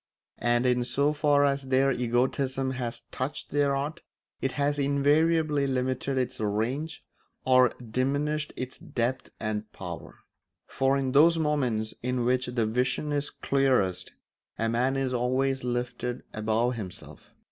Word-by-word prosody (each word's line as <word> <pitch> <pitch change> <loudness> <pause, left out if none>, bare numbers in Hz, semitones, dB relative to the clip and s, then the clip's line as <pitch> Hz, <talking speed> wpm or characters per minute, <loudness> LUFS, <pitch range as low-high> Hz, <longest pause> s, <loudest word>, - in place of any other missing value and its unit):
And 120 +1 +2
in 125 -1 +3
so 140 +4 +2
far 145 -1 +3
as 140 0 +2
their 135 +1 +4
egotism 130 +2 0
has 125 -2 -4
touched 140 +3 -4
their 145 -1 +2
art 145 +4 -3 0.4
it 135 - -1
has 145 0 0
invariably 145 +1 +2
limited 130 +1 -1
its 125 -2 -1
range 120 +9 -2 0.4
or 130 -1 +6
diminished 140 +6 -1
its 130 0 -5
depth 120 +2 -2
and 105 0 -3
power; - - -8 0.5
for 135 +1 +1
in 135 -1 -1
those 160 +5 +6
moments 130 -9 0
in 125 0 -1
which 125 0 +1
the 120 -2 0
vision 125 +6 0
is 145 0 0
clearest 130 -10 +1 0.4
a 115 - 0
man 125 +4 +1
is 135 -1 -1
always 130 +2 0
lifted 125 0 -3
above 110 +3 +1
himself. 95 -5 -9
130 Hz, 135 wpm, -28 LUFS, 120-140 Hz, 0.5 s, or